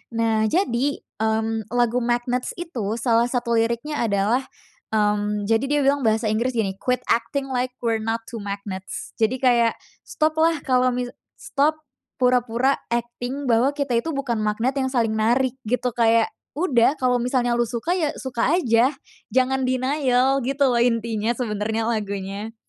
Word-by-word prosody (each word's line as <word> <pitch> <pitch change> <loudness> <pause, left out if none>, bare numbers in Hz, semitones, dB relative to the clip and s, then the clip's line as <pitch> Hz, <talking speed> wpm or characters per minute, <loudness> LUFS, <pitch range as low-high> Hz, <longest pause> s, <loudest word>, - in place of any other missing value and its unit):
Nah, 225 -1 +2
jadi, 280 - 0 0.2
mmm, 220 0 0
lagu 245 0 +2
Magnets 245 +1 -1
itu 240 - -3
salah 235 0 +2
satu 240 -1 -1
liriknya 235 +6 -1
adalah, 225 +4 +1 0.5
mmm, 210 0 +1
jadi 225 +3 +3
dia 295 +1 +1
bilang 280 +1 +3
bahasa 220 0 +1
Inggris 235 +4 0
gini, 195 -4 -1
"Quit 250 -1 -1
acting 270 +4 0
like 250 0 -1
we're 225 -1 +1
not 225 +1 -2
to 230 - -5
magnets," 200 -1 -6
jadi 225 +3 +2
kayak, 240 -3 +4 0.3
"Stop 310 0 0
lah 325 -2 +3
kalo 255 -1 +3
misal 245 0 -3 0.3
stop 310 -4 0 0.4
pura-pura 250 +1 +2 0.2
acting 245 +3 -3
bahwa 235 +4 +4
kita 280 -4 -1
itu 325 +7 -3
bukan 255 -5 -1
magnet 225 +5 0
yang 265 - +1
saling 230 -4 +1
narik," 245 +4 +2
gitu 250 +2 0
kayak, 230 -1 +3 0.3
"Udah 275 -7 +3
kalo 250 -1 +2
misalnya 245 -1 +1
lu 240 - +2
suka, 235 +8 -3
ya 310 -5 0
suka 260 +1 0
aja 250 -4 +3 0.4
jangan 260 +1 +2
denial," 260 0 +2
gitu 275 +2 +1
loh, 240 -1 +2
intinya 230 -2 +1
sebenernya 220 -1 -1
lagunya. 200 -1 -3
240 Hz, 155 wpm, -23 LUFS, 225-260 Hz, 0.5 s, kayak